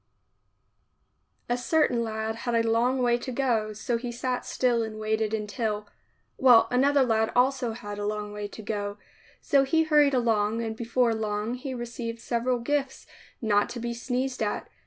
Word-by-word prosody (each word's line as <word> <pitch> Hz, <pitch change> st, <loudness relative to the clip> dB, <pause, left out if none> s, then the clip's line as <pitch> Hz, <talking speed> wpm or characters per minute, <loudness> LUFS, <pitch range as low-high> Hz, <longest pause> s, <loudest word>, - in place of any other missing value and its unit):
A 240 Hz, -, +1 dB
certain 245 Hz, -1 st, +1 dB
lad 220 Hz, 0 st, -3 dB
had 240 Hz, 0 st, -2 dB
a 230 Hz, 0 st, +2 dB
long 245 Hz, +3 st, +2 dB
way 240 Hz, 0 st, +3 dB
to 255 Hz, -, -5 dB
go, 235 Hz, -4 st, 0 dB
so 230 Hz, +3 st, -2 dB
he 240 Hz, +1 st, -5 dB
sat 250 Hz, +1 st, -3 dB
still 245 Hz, -2 st, +1 dB
and 220 Hz, -1 st, -5 dB
waited 215 Hz, 0 st, 0 dB
until 210 Hz, 0 st, -2 dB, 0.3 s
— -, -, -44 dB
well, 245 Hz, -3 st, +7 dB
another 275 Hz, +2 st, +4 dB
lad 220 Hz, -2 st, +1 dB
also 250 Hz, -1 st, +2 dB
had 205 Hz, -2 st, -7 dB
a 205 Hz, -, -2 dB
long 210 Hz, 0 st, -3 dB
way 210 Hz, 0 st, -4 dB
to 215 Hz, +2 st, -10 dB
go 205 Hz, -1 st, -3 dB, 0.2 s
— -, -, -28 dB
so 275 Hz, -1 st, +6 dB
he 320 Hz, +4 st, +2 dB
hurried 295 Hz, -3 st, +4 dB
along 225 Hz, -2 st, +1 dB
and 220 Hz, -1 st, -3 dB
before 235 Hz, +1 st, +1 dB
long 215 Hz, +1 st, -2 dB
he 255 Hz, +1 st, -5 dB
received 235 Hz, -1 st, -5 dB
several 240 Hz, +1 st, 0 dB
gifts 275 Hz, +2 st, -2 dB, 0.4 s
not 205 Hz, -2 st, +2 dB
to 240 Hz, -, -6 dB
be 235 Hz, 0 st, -3 dB
sneezed 250 Hz, +2 st, -2 dB
at. 210 Hz, -1 st, -2 dB
235 Hz, 180 wpm, -27 LUFS, 220-250 Hz, 0.4 s, well